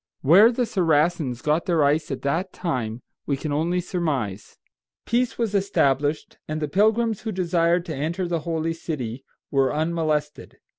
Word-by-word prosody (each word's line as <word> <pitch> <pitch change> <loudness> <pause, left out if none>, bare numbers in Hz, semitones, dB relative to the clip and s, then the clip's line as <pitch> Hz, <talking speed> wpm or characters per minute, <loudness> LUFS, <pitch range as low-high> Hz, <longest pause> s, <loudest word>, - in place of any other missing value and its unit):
Where 190 - +7
the 245 0 0
Saracens 160 - +1
got 150 +3 +1
their 165 -4 +3
ice 150 +2 +1
at 135 - -5
that 170 +7 -1
time 125 -9 -3 0.2
we 140 - 0
can 150 +2 -4
only 170 +4 0
surmise. 145 - -3 0.5
Peace 240 +1 0
was 230 -3 -1
established, 150 -7 0
and 155 0 -3
the 150 - -2
pilgrims 220 +5 +2
who 220 - -3
desired 175 -2 +1
to 160 -4 -5
enter 165 +6 -2
the 170 -1 -1
holy 165 0 -2
city 135 -7 -5 0.3
were 135 -2 +2
unmolested. 155 -1 -2
160 Hz, 155 wpm, -24 LUFS, 145-180 Hz, 0.5 s, Where